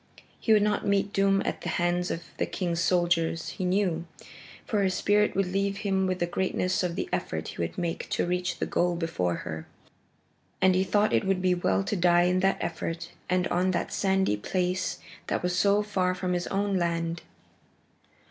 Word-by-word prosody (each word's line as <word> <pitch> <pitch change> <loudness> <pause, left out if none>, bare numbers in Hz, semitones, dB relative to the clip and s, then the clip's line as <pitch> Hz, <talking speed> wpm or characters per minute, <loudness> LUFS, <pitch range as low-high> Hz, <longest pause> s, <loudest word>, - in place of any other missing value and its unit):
He 225 - 0
would 210 -1 +6
not 210 0 +1
meet 200 0 +1
doom 195 0 +3
at - - -2
the - - -3
hands 175 +1 0
of 165 - -3
the - - 0
king's 170 -3 -2
soldiers, 170 -2 +1
he - - -5
knew, 180 -3 0 0.6
for 210 -2 0
his 190 -2 +1
spirit 210 +2 +2
would 195 0 +2
leave 195 +1 0
him 190 -1 +1
with 185 -1 0
the 175 - 0
greatness 185 +1 0
of 180 -2 -1
the - - -2
effort 80 0 -2
he - - -6
would 85 - -3
make 170 -2 -3
to - - 0
reach 180 +1 -1
the - - -1
goal 175 0 +1
before 95 - -1
her. 80 0 -6 0.9
And 190 0 +5
he 185 +1 +3
thought 205 +2 +2
it - - +3
would 190 -1 +2
be 185 0 +2
well 100 - +1
to - - -2
die 175 -1 +4
in 180 +1 +2
that 195 +1 +2
effort 170 0 -4 0.2
and 180 0 +2
on 180 +2 +1
that 170 - -2
sandy 190 - +1
place 180 - -1 0.3
that - - -1
was 180 0 0
so 200 +3 +3
far 185 -3 0
from 185 0 -2
his 175 0 -1
own 200 0 0
land. 170 -1 -1
180 Hz, 195 wpm, -27 LUFS, 170-195 Hz, 0.9 s, would